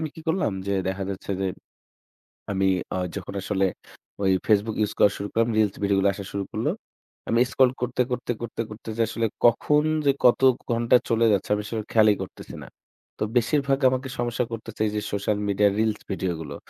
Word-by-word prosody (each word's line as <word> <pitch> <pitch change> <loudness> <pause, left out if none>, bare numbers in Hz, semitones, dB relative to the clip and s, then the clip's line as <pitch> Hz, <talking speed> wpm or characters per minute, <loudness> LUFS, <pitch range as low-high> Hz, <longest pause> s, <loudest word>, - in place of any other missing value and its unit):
আমি 160 - -2
কি 165 - -10
করলাম 175 - +1
যে 100 - 0 0.2
দেখা 95 +1 -2
যাচ্ছে 100 +1 -6
যে, 95 - 0 1.1
আমি 95 0 +1 0.3
আ - - -1 0.2
যখন 100 0 -6
আসলে 95 0 0 0.6
ওই 95 -1 +3
Facebook 105 +1 +2
use - - -4
করা 100 - +6
শুরু 100 +1 -4
করলাম, 115 +1 +2
reels 105 -3 +2
ভিডিওগুলো 100 0 +3
আসা 100 - -7
শুরু 100 0 -2
করলো। - - 0 0.6
আমি 115 - +2
scroll 130 -1 +4
করতে, 125 0 -2
করতে, 125 -1 -2
করতে, 120 -1 -5
করতে 110 +1 -10
যে 115 - +2
আসলে 115 0 -1 0.2
কখন 150 +6 +3 0.2
যে, - - +7
কত 125 +1 +6 0.3
ঘণ্টা 120 +1 +4
চলে 115 0 +2
যাচ্ছে 100 -1 -1
আমি 105 - -2
সেটার 110 -2 -4
খেয়ালই 110 -2 +5
করতেছি - - -9
না। - - -10 0.5
তো - - -3
বেশিরভাগ 140 +3 +2
আমাকে 130 +1 -2
সমস্যা 120 0 0
করতেছে, 115 -1 -7
এই 105 - 0
যে - - +1
social 100 +1 0
media 100 +1 +3
reels 110 -1 +1
ভিডিওগুলো। 85 -6 -3
110 Hz, 185 wpm, -25 LUFS, 100-120 Hz, 1.1 s, যে